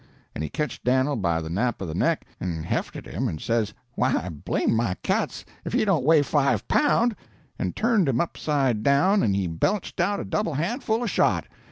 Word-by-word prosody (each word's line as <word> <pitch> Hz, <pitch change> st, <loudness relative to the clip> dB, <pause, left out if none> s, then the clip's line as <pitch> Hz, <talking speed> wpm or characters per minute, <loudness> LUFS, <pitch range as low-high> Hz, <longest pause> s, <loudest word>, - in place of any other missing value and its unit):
And 75 Hz, -, -4 dB
he 75 Hz, -, -3 dB
ketched 150 Hz, -, -3 dB
Dan'l 130 Hz, +3 st, +2 dB
by 85 Hz, -5 st, 0 dB
the 80 Hz, -, -6 dB
nap 120 Hz, +7 st, 0 dB
of 95 Hz, -, -4 dB
the 80 Hz, -, -4 dB
neck, -, -, +1 dB
and 85 Hz, -3 st, -3 dB
hefted -, -, -3 dB
him, -, -, -2 dB
and 80 Hz, -, -4 dB
says, 115 Hz, +1 st, 0 dB, 0.2 s
'Why 120 Hz, -8 st, 0 dB
blame 75 Hz, +6 st, -1 dB
my 110 Hz, -5 st, 0 dB
cats -, -, -1 dB, 0.2 s
if -, -, -5 dB
he -, -, +2 dB
don't 180 Hz, -10 st, +2 dB
weigh 155 Hz, +1 st, +5 dB
five 140 Hz, -1 st, +1 dB
pound!' 240 Hz, -6 st, +3 dB, 0.4 s
and -, -, -2 dB
turned 220 Hz, -8 st, +2 dB
him 125 Hz, -2 st, +1 dB
upside 135 Hz, -8 st, 0 dB
down 180 Hz, -, +4 dB
and 100 Hz, -3 st, +2 dB
he 100 Hz, -1 st, 0 dB
belched 90 Hz, -, -1 dB
out 200 Hz, +4 st, +1 dB
a -, -, -4 dB
double 170 Hz, -8 st, -1 dB
handful 220 Hz, -, -1 dB
of 230 Hz, -, -1 dB
shot. -, -, +2 dB
135 Hz, 200 wpm, -25 LUFS, -, 0.4 s, weigh